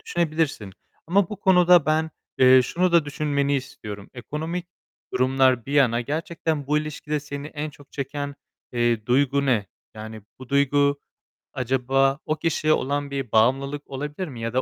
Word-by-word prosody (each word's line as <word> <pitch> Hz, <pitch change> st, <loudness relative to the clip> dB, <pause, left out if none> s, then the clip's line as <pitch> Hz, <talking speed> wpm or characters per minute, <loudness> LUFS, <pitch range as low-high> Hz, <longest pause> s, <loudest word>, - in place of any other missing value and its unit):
düşünebilirsin. 155 Hz, -, -1 dB, 0.3 s
Ama 185 Hz, +1 st, +2 dB
bu 210 Hz, -, -6 dB
konuda 180 Hz, -4 st, +5 dB
ben, 160 Hz, +1 st, +1 dB, 0.3 s
eee, 130 Hz, 0 st, +7 dB
şunu 180 Hz, +5 st, 0 dB
da 170 Hz, -3 st, +5 dB
düşünmeni 145 Hz, -1 st, -1 dB
istiyorum. 105 Hz, -7 st, -8 dB
Ekonomik 160 Hz, +8 st, -5 dB, 0.5 s
durumlar 130 Hz, -2 st, +2 dB
bir 140 Hz, -, -5 dB
yana, 125 Hz, -5 st, +3 dB
gerçekten 155 Hz, +1 st, -3 dB
bu 150 Hz, +2 st, +2 dB
ilişkide 150 Hz, 0 st, -4 dB
seni 145 Hz, 0 st, -7 dB
en 150 Hz, 0 st, -5 dB
çok 145 Hz, 0 st, -19 dB
çeken, 145 Hz, 0 st, -4 dB, 0.4 s
eee, 120 Hz, -3 st, 0 dB
duygu 140 Hz, +2 st, +2 dB
ne? 115 Hz, -7 st, +1 dB, 0.3 s
Yani 110 Hz, 0 st, -8 dB, 0.2 s
bu 130 Hz, -1 st, -11 dB
duygu 140 Hz, 0 st, +2 dB, 0.5 s
acaba 135 Hz, +2 st, +1 dB
o 155 Hz, -, 0 dB
kişiye 155 Hz, -1 st, +1 dB
olan 140 Hz, +1 st, -1 dB
bir 135 Hz, -5 st, -4 dB
bağımlılık 135 Hz, +6 st, +1 dB
olabilir 150 Hz, +6 st, -5 dB
mi 125 Hz, -6 st, -8 dB
ya 115 Hz, 0 st, -3 dB
da 130 Hz, -, +2 dB
140 Hz, 150 wpm, -24 LUFS, 130-155 Hz, 0.5 s, eee